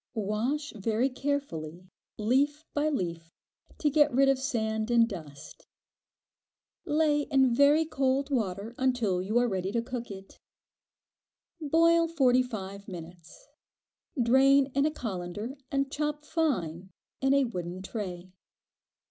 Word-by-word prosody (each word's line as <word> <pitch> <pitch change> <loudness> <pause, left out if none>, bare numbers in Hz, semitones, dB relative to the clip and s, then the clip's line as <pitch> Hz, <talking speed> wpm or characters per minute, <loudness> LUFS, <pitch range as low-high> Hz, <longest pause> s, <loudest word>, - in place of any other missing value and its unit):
Wash 230 +9 -2
very 225 +5 0
carefully, 185 - -4 0.3
leaf 280 +8 +1
by 300 +1 +1
leaf, 170 - -3 0.5
to 305 - 0
get 295 0 +4
rid 270 +2 +4
of 270 -1 +2
sand 220 -3 -2
and 235 -1 +4
dust. 155 -9 -10 1.2
Lay 295 -1 +1
in 265 -3 +3
very 285 +5 +5
cold 275 -1 0
water 210 -3 -2
until 240 -8 +1
you 210 +5 -1
are 245 0 +3
ready 190 -3 -2
to 235 - 0
cook 245 -1 -6
it. 195 -1 -11 1.2
Boil 330 +2 +4
forty 260 -6 +3
five 200 -5 -6
minutes; 175 - -11 0.7
drain 265 +3 +4
in 280 +2 +2
a - - -1
colander 210 - -5
and 275 0 -1
chop 300 0 -3
fine 190 - -1 0.3
in 270 +1 +3
a 280 - +4
wooden 180 -5 -5
tray. 185 -4 -6
245 Hz, 125 wpm, -29 LUFS, 195-280 Hz, 1.2 s, very